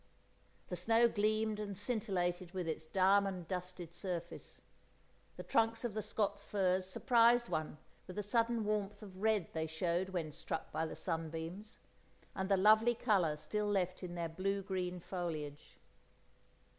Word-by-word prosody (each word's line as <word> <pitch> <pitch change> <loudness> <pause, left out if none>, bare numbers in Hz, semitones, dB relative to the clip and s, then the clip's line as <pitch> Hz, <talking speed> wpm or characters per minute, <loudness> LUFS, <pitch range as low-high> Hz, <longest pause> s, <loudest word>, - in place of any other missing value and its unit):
The 180 - -2
snow 225 +7 +4
gleamed 215 0 +1
and 200 -2 -4
scintillated 185 -5 -1
with 180 -3 -3
its 160 0 -3
diamond 190 -1 +3
dusted 180 -2 -4
surface; 175 -2 -5 0.7
the - - -5
trunks 225 +1 +2
of 235 - -2
the 215 - -2
Scots 205 -1 -1
firs 185 -2 +1
surprised 235 +3 +4
one 155 -1 -2 0.3
with 185 - -8
the 210 - -2
sudden 230 +1 +1
warmth 210 0 -1
of 190 -2 -10
red 215 -5 +2
they 160 0 -1
showed 170 +3 -1
when 170 -5 -3
struck 160 - -4
by 160 +1 -1
the - - -6
sunbeams, 165 +5 -4 0.6
and 190 +1 -3
the 195 - +4
lovely 215 +4 +6
colour 190 -10 +2
still 210 +6 -2
left 185 -3 0
in 175 -2 -6
their 170 -1 -1
blue 195 +4 -1
green 180 -2 -2
foliage. 155 -5 -5
190 Hz, 150 wpm, -36 LUFS, 175-210 Hz, 0.7 s, lovely